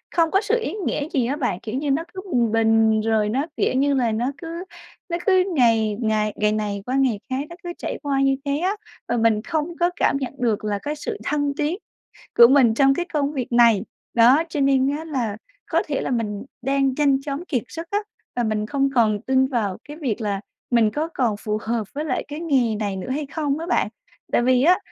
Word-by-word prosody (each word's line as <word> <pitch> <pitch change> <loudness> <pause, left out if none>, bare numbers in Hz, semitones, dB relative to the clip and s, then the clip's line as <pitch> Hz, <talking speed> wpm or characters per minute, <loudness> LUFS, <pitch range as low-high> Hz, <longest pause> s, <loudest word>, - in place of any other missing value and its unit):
không 330 -2 +3
có 390 - +3
sự 450 +3 +1
ý - - -3
nghĩa 290 +1 -2
gì 260 -6 +1
á 275 - -1
bạn. 245 - -1
Kiểu 220 +3 -6
như 285 +1 -1
nó 295 +4 +1
cứ 375 - -6
bình 235 -3 +2
bình 225 -1 +3
rồi 215 -1 +1
nó, 265 +7 0
kiểu - - +1
như 280 +2 +2
là, 245 -4 +1
nó 240 +5 -1
cứ 335 +3 -6 0.5
nó 340 - -1
cứ 375 -2 +5
ngày 225 -5 +3
ngày 215 -2 +1
ngày 210 0 +1
này 210 -2 -2
qua 255 - -2
ngày 260 -6 +2
khác 265 +2 -2
nó 340 - -9
cứ 350 0 -5
trải - - -4
qua 275 -1 0
như 270 0 +3
thế 280 0 0
á, 370 +6 0 0.3
và 240 - 0
mình 225 -2 +3
không 320 +5 -3
có 345 0 +3
cảm - - +2
nhận 265 -2 -4
được 230 -4 0
là 205 -1 -1
cái 295 +1 -2
sự 420 +8 -5
thăng 290 -1 0
tiến 305 +4 0 0.6
của 235 - +10
mình 260 -3 +5
trong 270 +3 +4
cái 350 +5 -2
công 290 -1 0
việc 255 -4 -4
này. 235 -4 +5 0.3
Đó, 245 +7 +6
cho 300 - -3
nên 275 -1 +3
á 320 - -7
là 245 -9 -2 0.3
có 330 0 +1
thể 285 -3 -1
là - - -3
mình 210 -4 -2 0.2
đang 270 +1 +1
nhanh 280 -2 +3
chóng 285 +4 -5
kiệt 250 -7 -1
sức 330 0 -7
á, 405 - +2 0.4
và 245 - 0
mình 215 -1 -1
không 275 +3 0
còn 215 -4 +3
tin 265 0 +2
vào 220 -8 -1
cái 295 +1 -8
việc 250 -8 -2
là 200 -2 -2 0.3
mình 230 -3 +4
có 305 +6 -2
còn 235 -5 +1
phù 215 -1 -2
hợp 225 -2 -2
với 300 +2 -3
lại 265 -5 -2
cái 295 +1 -6
nghề 265 -9 +1
này 205 -2 -2
nữa 190 - -6
hay 290 +3 -2
không 290 0 -2
á 330 - -4
bạn. - - +2 0.4
Tại - - +3
vì 255 +1 +3
á, 360 +4 +6
265 Hz, 235 wpm, -22 LUFS, 225-295 Hz, 0.6 s, của